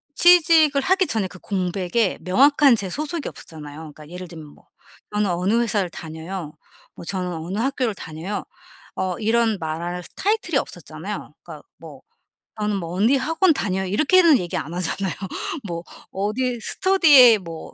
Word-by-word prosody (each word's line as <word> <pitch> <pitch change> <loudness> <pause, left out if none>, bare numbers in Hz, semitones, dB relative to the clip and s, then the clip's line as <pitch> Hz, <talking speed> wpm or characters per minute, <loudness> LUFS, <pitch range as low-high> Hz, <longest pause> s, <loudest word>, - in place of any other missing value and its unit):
취직을 320 -5 +5
하기 375 +4 +2
전에 210 -4 -1
그 180 - -13
공백에 190 +2 -1
명확한 275 +7 +4
제 200 -4 -4
소속이 305 - -4
없었잖아요. 150 -1 -11
그니까 150 -1 -14
예를 180 +1 -8
들면 160 -2 -10
뭐 - - -20 0.5
"저는 210 -2 +1
어느 195 +7 +1
회사를 205 -6 0
다녀요." 160 0 -7 0.4
뭐 - - -10
"저는 180 -1 -3
어느 170 +5 -5
학교를 250 -4 -1
다녀요." 165 +6 -6 0.5
어 185 -2 -2
이런 225 -1 +1
말할 170 +3 -4
타이틀이 425 +2 0
없었잖아요. - - -6
그니까 - - -11
뭐 - - -12 0.6
"나는 210 -1 -1
뭐 170 -1 -5
언니 230 +8 +3
학원 325 +5 +2
다녀요." 190 -8 -2
이렇게는 310 - +4
얘기 175 -1 -5
안 160 +4 -5
하잖아요. 185 +2 -2 0.5
뭐 170 0 -5 0.3
"어디 235 +5 -2
스터디에 290 - +6
뭐 165 -3 -9
200 Hz, 335 characters per minute, -22 LUFS, 175-270 Hz, 0.6 s, 스터디에